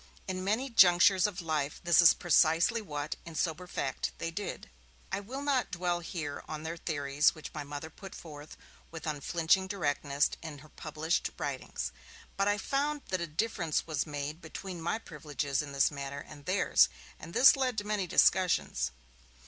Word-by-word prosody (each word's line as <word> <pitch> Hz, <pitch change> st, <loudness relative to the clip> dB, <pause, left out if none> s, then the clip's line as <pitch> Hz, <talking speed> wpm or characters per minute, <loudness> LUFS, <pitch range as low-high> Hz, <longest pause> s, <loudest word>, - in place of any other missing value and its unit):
In 185 Hz, -1 st, -3 dB
many 220 Hz, +7 st, 0 dB
junctures 185 Hz, -2 st, +6 dB
of 195 Hz, -3 st, -6 dB
life 150 Hz, -2 st, -1 dB
this 175 Hz, -1 st, +6 dB
is 170 Hz, -, +8 dB
precisely 170 Hz, +6 st, +3 dB
what, 150 Hz, -6 st, -4 dB
in 165 Hz, -1 st, -10 dB
sober 170 Hz, +3 st, -1 dB
fact, 135 Hz, -6 st, -3 dB
they 165 Hz, -, -3 dB
did. 200 Hz, +4 st, -5 dB, 0.4 s
I 190 Hz, -, -1 dB
will 255 Hz, +8 st, -6 dB
not 275 Hz, -3 st, +1 dB
dwell 175 Hz, -1 st, -1 dB
here 160 Hz, -4 st, -5 dB
on 155 Hz, 0 st, -6 dB
their 165 Hz, +1 st, -4 dB
theories, 145 Hz, -3 st, +1 dB
which 155 Hz, -, -9 dB
my 150 Hz, -, -4 dB
Mother 145 Hz, +2 st, -7 dB
put 195 Hz, +3 st, -11 dB
forth, 150 Hz, -2 st, -10 dB, 0.3 s
with 160 Hz, -1 st, -8 dB
unflinching 165 Hz, +5 st, +1 dB
directness, 145 Hz, -6 st, 0 dB
in 155 Hz, -3 st, -7 dB
her -, -, -17 dB
published 155 Hz, +3 st, -2 dB
writings. -, -, -4 dB, 0.4 s
But 195 Hz, +1 st, +1 dB
I 205 Hz, 0 st, +2 dB
found 285 Hz, +5 st, -1 dB
that 185 Hz, -2 st, -1 dB
a 170 Hz, -, -2 dB
difference 170 Hz, -1 st, -1 dB
was 155 Hz, -2 st, -2 dB
made 145 Hz, +2 st, -5 dB
between 175 Hz, +2 st, -7 dB
my 170 Hz, +6 st, 0 dB
privileges 150 Hz, -, -3 dB
in 145 Hz, -1 st, -7 dB
this 140 Hz, +1 st, +3 dB
matter 140 Hz, 0 st, -6 dB
and 145 Hz, -2 st, -13 dB
theirs, 185 Hz, +2 st, +4 dB, 0.3 s
and 165 Hz, -, -10 dB
this 265 Hz, -, +8 dB
led 255 Hz, -4 st, -1 dB
to 205 Hz, -, 0 dB
many 205 Hz, -3 st, -1 dB
discussions. 180 Hz, -, +3 dB
165 Hz, 175 wpm, -31 LUFS, 150-190 Hz, 0.4 s, is